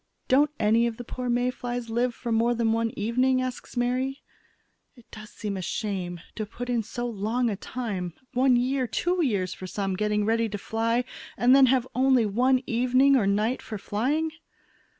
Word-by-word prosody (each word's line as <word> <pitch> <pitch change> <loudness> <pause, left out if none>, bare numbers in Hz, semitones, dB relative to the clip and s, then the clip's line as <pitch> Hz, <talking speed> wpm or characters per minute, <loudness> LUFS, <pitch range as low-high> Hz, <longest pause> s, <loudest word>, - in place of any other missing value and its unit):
"Don't 285 +3 +4
any 225 +3 +3
of 225 -1 -4
the 245 - -6
poor 250 +1 -5
May 245 +1 +1
flies 245 -2 -5
live 240 +1 0
for 235 - -5
more 230 +2 +2
than 230 -1 +1
one 230 0 +1
evening?" 255 +5 +2
asks 255 0 -5
Mary. 255 +3 -1 0.7
"It 240 -3 -18
does 215 -1 -10
seem 210 -2 -5
a - - -4
shame 185 -3 -3
to 215 - -4
put 245 +3 -5
in 235 -2 +1
so 240 +3 -4
long 230 +2 -1
a - - -2
time, 195 -6 -5 0.2
one 255 0 +4
year, 255 +1 +1
two 350 +7 0
years 190 - 0
for 185 - -8
some, 195 0 -2
getting 210 +1 0
ready 225 +1 +1
to 205 - -4
fly 230 +4 0 0.3
and 250 +2 +5
then 270 -1 +7
have 255 -1 +2
only 260 -2 +3
one 250 +5 +2
evening 255 +3 +3
or 220 -7 +2
night 215 +5 +1
for 215 - -6
flying." 275 +11 -1
235 Hz, 190 wpm, -26 LUFS, 215-255 Hz, 0.7 s, then